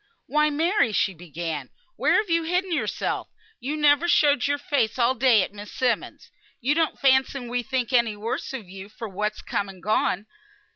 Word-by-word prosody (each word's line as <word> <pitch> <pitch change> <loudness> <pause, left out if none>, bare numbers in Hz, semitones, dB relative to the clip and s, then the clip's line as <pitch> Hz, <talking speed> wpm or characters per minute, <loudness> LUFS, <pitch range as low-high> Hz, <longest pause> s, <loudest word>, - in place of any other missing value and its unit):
"Why, 300 +1 +2
Mary!" 320 - +1
she 195 - +1
began. 165 -1 -5 0.3
"Where - - +2
have 425 -1 +2
you 335 -1 +2
hidden 360 +3 -1
yourself? 250 -11 -2 0.3
You 280 +5 -3
never 295 +2 +4
showed 290 -6 +4
your 285 0 +1
face 280 -6 0
all 240 0 +3
yesterday 240 -5 +4
at - - -6
Miss 205 0 -9
Simmonds'. 245 -4 -2 0.3
You 275 +3 +1
don't 320 0 0
fancy 265 0 +3
we 245 +1 -1
think 260 0 -2
any 235 -3 +3
the 205 - -13
worse 225 +3 -3
of 250 -8 -7
you 190 +2 -10
for 225 +1 -7
what's 210 +2 -3
come 200 -1 -2
and 185 -3 -13
gone. 205 -1 +1
245 Hz, 190 wpm, -25 LUFS, 210-290 Hz, 0.3 s, never